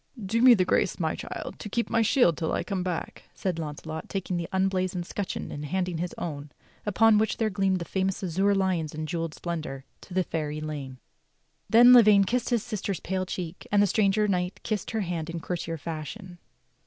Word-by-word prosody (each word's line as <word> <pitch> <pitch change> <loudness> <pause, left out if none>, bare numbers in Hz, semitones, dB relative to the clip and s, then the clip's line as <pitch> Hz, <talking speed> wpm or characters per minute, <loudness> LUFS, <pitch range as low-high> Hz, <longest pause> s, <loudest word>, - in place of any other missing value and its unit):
"Do 220 +3 -1
me 250 -1 +9
the 185 -3 +2
grace, 190 +1 +1
my 160 -2 0
child, - - -7
to 210 - -6
keep 235 +3 -1
my 230 - +2
shield 225 - +4
till 160 - -2
I - - 0
come 195 -3 -2
back," 180 -2 -4
said 180 -4 -2
Launcelot 155 +1 -6
taking 190 -2 -3
the 170 -1 -3
unblazoned 185 -1 0
scutcheon 200 +2 -4
and 145 - -6
handing 180 +2 -2
his 175 +1 -3
own, 145 -3 -5 0.4
upon 215 +1 +5
whch 220 - 0
there 220 -2 0
gleamed 190 0 +1
the 170 - -5
famous 190 +1 -1
azure 190 +3 +2
lions 180 -6 0
in 155 0 -3
jewelled 165 -1 -3
splendor, 155 -6 -5 0.2
to 180 - -11
the 185 - +3
fair 155 -3 -3
Elaine. 150 -4 -5 0.7
Then 240 +2 +8
Lavaine 215 -5 +7
kissed 240 +5 -1
his 235 -4 +1
sister's 200 -6 -3
pale 185 0 -2
cheeks, 180 -1 -6
and 205 - +4
the - - +5
stranger 210 +1 +2
knight 180 -1 -1
kissed 210 -4 -2
her 220 -1 -1
hand 170 -4 -3
in 165 0 -4
courtier 165 -1 -4
fashion. 170 +4 -7
185 Hz, 200 wpm, -27 LUFS, 165-205 Hz, 0.7 s, me